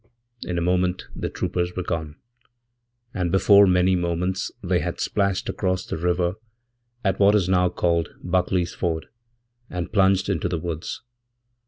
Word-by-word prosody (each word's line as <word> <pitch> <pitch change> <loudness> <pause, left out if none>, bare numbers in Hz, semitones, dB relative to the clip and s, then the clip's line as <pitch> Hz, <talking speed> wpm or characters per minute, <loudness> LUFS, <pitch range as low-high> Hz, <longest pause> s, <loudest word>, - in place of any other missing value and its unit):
'In 90 - -3
a - - 0
moment 90 +1 0
the - - -3
troopers 90 0 -2
were 90 - -2
gone, 80 -4 -3 1.0
and 90 -4 -1
before 100 +1 +6
many 90 0 +3
moments 90 +2 -1
they - - +1
hadsplashed 100 -2 -1
across 95 -2 -1
the - - -4
river 90 +2 0 0.7
at 95 - +1
what 100 +1 +5
is 95 -4 +2
now 90 -1 +3
called 85 -1 0
Buckley's 90 -1 0
Ford, 80 -3 -2 0.6
andplunged 95 +1 +1
into 90 -3 -1
the 85 - -1
woods. 80 0 -5
90 Hz, 140 wpm, -24 LUFS, 85-95 Hz, 1.0 s, before